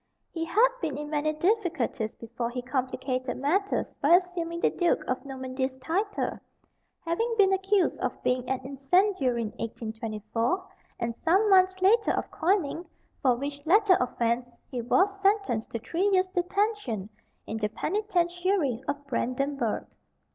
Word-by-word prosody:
He 330 -1 -3
had 450 +8 +4
been 285 -3 -2
in 295 0 -6
many 305 0 +1
difficulties 330 - 0
before 235 +1 -4
he 245 +1 -5
complicated 255 0 -2
matters 370 +10 0
by 315 +5 +7
assuming 345 -2 -1
the - - +3
Duke 350 -1 +1
of 255 - -2
Normandy's 260 -1 -3
titles, 380 +10 -2 0.7
having 455 +8 0
been 390 -2 +5
accused 385 0 +1
of - - -3
being 250 0 0
an 265 -1 -1
incendiary 275 - +1
in 215 - -3
1824, 225 - -3 0.3
and 235 0 -2
some 375 - +2
months 375 0 +5
later 435 +4 +5
of - - -3
coining, 345 -2 0 0.4
for 255 -3 +4
which 280 +3 -5
latter 390 +4 +5
offence 240 0 -1
he 250 -3 -2
was 390 - +2
sentenced 395 - +1
to - - -3
three 345 - 0
years' 370 -1 +4
detention 365 - -1 0.4
in 220 - -4
the 210 -1 -1
Penitentiary 350 - 0
of 285 0 -3
Brandenburg. 260 -2 -1
290 Hz, 140 wpm, -28 LUFS, 250-375 Hz, 0.7 s, by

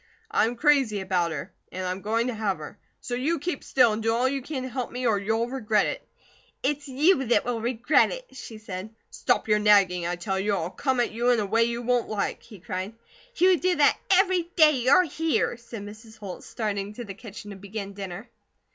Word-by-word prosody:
I - - +3
am 240 - -3
crazy 270 -6 +3
about 185 -3 0
her, 160 +4 -6 0.2
an' 185 0 -4
I'm 185 +1 -3
going 225 +3 0
to 250 - -2
have 210 -3 -1
her; 155 +6 -10 0.2
so 245 - -6
you 285 +8 0
keep 295 -1 -4
still, 255 -4 +4
an' 215 +1 -2
do 225 +1 +1
all 240 +3 +2
you 275 +1 -1
can 265 -1 -5
to 260 - -5
help 250 -1 -4
me, 250 +1 -4
or 215 -4 +3
you'll 220 +3 0
regret 220 -5 +1
it." - - -3 0.6
"It's 290 +2 -1
you 275 +2 +3
that 240 - +2
will 235 -2 -2
regret 245 +5 +2
it!" - - -8
she 230 -4 -9
said. 200 -2 -7 0.2
"Stop - - 0
your 210 -1 +3
nagging, 195 -4 +4
I 175 - -1
tell 190 +2 -2
you, 205 +2 0
or 185 -4 0
I'll 165 - -3
come 265 +1 -1
at 240 - 0
you 235 +3 0
in 245 -2 +4
a 210 - 0
way 225 +3 +3
you 235 +1 -3
won't 245 0 +1
like," 210 -2 -2
he 210 - -14
cried. 185 +5 -5 0.4
"You 365 -5 +4
do 365 0 +2
that 290 -1 +4
every 370 -3 +3
day 310 -3 +7
you're 265 +5 +4
here," 325 -5 0
said 235 -3 -9
Mrs. 215 +2 -12
Holt, 200 -4 -8
starting 205 -2 -3
to 240 - -6
the 200 - -7
kitchen 210 0 -10
to - - -8
begin 200 +1 -7
dinner. 195 +2 -7
225 Hz, 225 wpm, -26 LUFS, 200-265 Hz, 0.6 s, day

